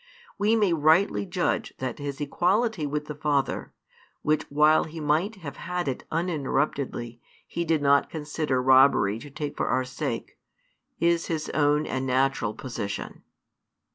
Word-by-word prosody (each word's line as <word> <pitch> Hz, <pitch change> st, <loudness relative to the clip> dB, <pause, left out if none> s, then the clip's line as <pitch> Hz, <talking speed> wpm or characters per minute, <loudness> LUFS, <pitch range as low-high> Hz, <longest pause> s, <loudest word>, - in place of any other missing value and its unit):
We 210 Hz, +2 st, +3 dB
may 205 Hz, -6 st, +3 dB
rightly 155 Hz, -, +3 dB
judge -, -, -1 dB
that 130 Hz, 0 st, -4 dB
His 140 Hz, -1 st, -5 dB
equality 180 Hz, -, +1 dB
with 150 Hz, +1 st, -3 dB
the 150 Hz, -, -5 dB
Father, 145 Hz, -2 st, -1 dB, 0.5 s
which 155 Hz, 0 st, 0 dB
while 150 Hz, +2 st, +4 dB
He 160 Hz, +1 st, -8 dB
might 155 Hz, +8 st, +1 dB
have 160 Hz, -8 st, -8 dB
had 180 Hz, -2 st, -3 dB
it 130 Hz, -, -3 dB
uninterruptedly 140 Hz, -7 st, -2 dB, 0.2 s
He 170 Hz, -, -3 dB
did 160 Hz, -2 st, +1 dB
not 140 Hz, 0 st, +4 dB
consider 150 Hz, -4 st, -2 dB
robbery 130 Hz, -6 st, +5 dB
to 145 Hz, -, -10 dB
take 145 Hz, +1 st, -5 dB
for -, -, -1 dB
our 130 Hz, 0 st, +1 dB
sake, 130 Hz, 0 st, -5 dB, 0.6 s
is 170 Hz, +1 st, +2 dB
His 160 Hz, -2 st, -2 dB
own 150 Hz, 0 st, +2 dB
and 130 Hz, 0 st, -2 dB
natural 130 Hz, -4 st, +1 dB
position. 105 Hz, -6 st, -5 dB
150 Hz, 145 wpm, -26 LUFS, 135-165 Hz, 0.6 s, robbery